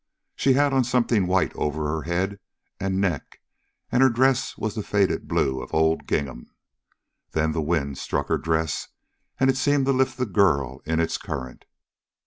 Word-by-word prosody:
She 135 - +3
had 140 +1 +3
on 135 -1 +4
something 120 -5 +1
white 95 +1 +1
over 75 +1 -2
her 80 +1 -2
head 95 +4 -2 0.4
and 95 0 -1
neck, 90 -8 -2 0.5
and 125 - +3
her 135 - +7
dress 130 +2 +1
was 110 -2 -2
the 110 - -3
faded 100 -1 0
blue 65 -1 0
of - - -6
old 80 0 +2
gingham. 65 -4 -2 0.8
Then 80 0 +1
the 80 - -1
wind 70 -4 -1
struck 70 - -2
her - - +1
dress, 80 -2 -1 0.5
and 130 - +4
it 135 -1 +2
seemed 140 +1 +2
to 135 - +2
lift 130 0 +1
the 125 - 0
girl 90 - +1
in 80 +1 0
its 85 -1 0
current. 65 -2 -6
95 Hz, 175 wpm, -24 LUFS, 80-125 Hz, 0.8 s, her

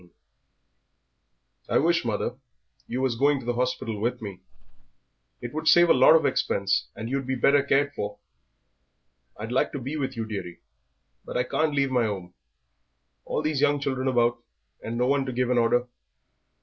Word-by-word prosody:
XV 90 - -21 1.6
"I - - +3
wish, 170 +2 +2
mother, 115 +1 -2 0.5
you 125 - -3
was 130 -3 0
going 140 +3 +2
to 125 - -10
the 120 - 0
hospital 125 -3 -2
with 120 +3 -1
me; 100 -4 -8 1.0
it 120 0 -6
would 155 +1 -4
save 175 +1 +6
a - - +8
lot 130 +5 +6
of 160 - +3
expense 65 - 0
and 110 +2 -6
you'd 135 +1 -2
be 130 - 0
better 140 +3 +4
cared 140 +1 +1
for." 105 -4 -5 1.2
"I'd 110 +3 -6
like 130 - +1
to 140 - -3
be 135 +5 -4
with 135 -4 -3
you, 115 - -2
dearie, 95 -5 -6 0.6
but - - -5
I 125 - +2
can't 155 +1 -1
leave 140 -1 +1
my 125 -2 +2
'ome, 95 -4 -6 0.9
all - - -2
these 155 -3 -1
young 145 0 +3
children 135 -2 -2
about 120 -2 +2 0.4
and 115 +1 -4
no 125 - +2
one 140 +1 +2
to - - -2
give 125 0 0
an 125 - +3
order. 120 +1 +2
125 Hz, 180 wpm, -26 LUFS, 115-140 Hz, 1.6 s, a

